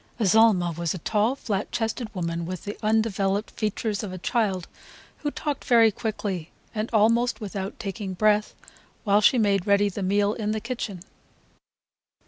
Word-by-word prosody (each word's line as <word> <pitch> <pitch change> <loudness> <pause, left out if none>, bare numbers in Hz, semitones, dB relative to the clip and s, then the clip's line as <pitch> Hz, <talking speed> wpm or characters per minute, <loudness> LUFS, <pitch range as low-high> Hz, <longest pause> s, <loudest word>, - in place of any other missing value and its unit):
Azalma 205 -4 +4
was 170 +1 -2
a - - -4
tall, 215 +8 +1
flat 210 -7 -3
chested 225 0 -2
woman 170 -2 -2
with 180 +1 -5
the 205 - -5
undeveloped 215 -2 +1
features 215 -1 -2
of 205 -4 -5
a 185 - -6
child, 195 -3 -1 0.5
who 295 - -2
talked 290 -1 -4
very 230 -3 +5
quickly 200 -6 -4 0.2
and 215 0 -2
almost 230 +2 +3
without 200 -1 -5
taking 195 -3 -5
breath 210 +2 +2 0.5
while 205 -1 +4
she 250 - +5
made 200 -3 +2
ready 200 0 +4
the 200 +1 -6
meal 200 +2 +2
in 215 -1 -2
the 220 - -1
kitchen. 220 -5 -5
210 Hz, 155 wpm, -25 LUFS, 195-225 Hz, 0.5 s, very